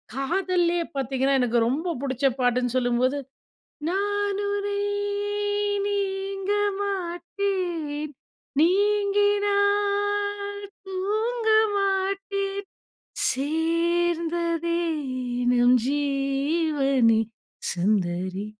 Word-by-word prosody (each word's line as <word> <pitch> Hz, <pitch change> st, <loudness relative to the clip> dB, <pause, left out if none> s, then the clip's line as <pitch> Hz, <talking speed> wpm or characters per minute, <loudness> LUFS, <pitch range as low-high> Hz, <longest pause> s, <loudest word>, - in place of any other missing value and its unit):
காதல்லேயே 345 Hz, +3 st, +1 dB
பார்த்தீங்கன்னா, 270 Hz, +1 st, +1 dB
எனக்கு 240 Hz, -1 st, +2 dB
ரொம்ப 320 Hz, +8 st, -1 dB
பிடிச்ச 265 Hz, -1 st, -1 dB
பாட்டுன்னு 245 Hz, 0 st, +1 dB
சொல்லும்போது, 250 Hz, +2 st, +1 dB, 0.7 s
"நான் 405 Hz, +1 st, 0 dB
உனை 405 Hz, 0 st, -2 dB, 1.1 s
நீங்க 390 Hz, -1 st, -2 dB, 0.3 s
மாட்டேன், 350 Hz, -5 st, -2 dB, 0.5 s
நீங்கினால் 405 Hz, +1 st, +1 dB, 0.2 s
தூங்க 435 Hz, +5 st, -1 dB, 0.3 s
மாட்டேன், 395 Hz, 0 st, -1 dB, 0.7 s
சேர்ந்ததே 335 Hz, +3 st, 0 dB, 0.7 s
நம் 245 Hz, +1 st, +5 dB
ஜீவனே! 275 Hz, -3 st, +1 dB, 0.5 s
சுந்தரி" 185 Hz, 0 st, 0 dB
345 Hz, 60 wpm, -25 LUFS, 275-400 Hz, 1.1 s, நம்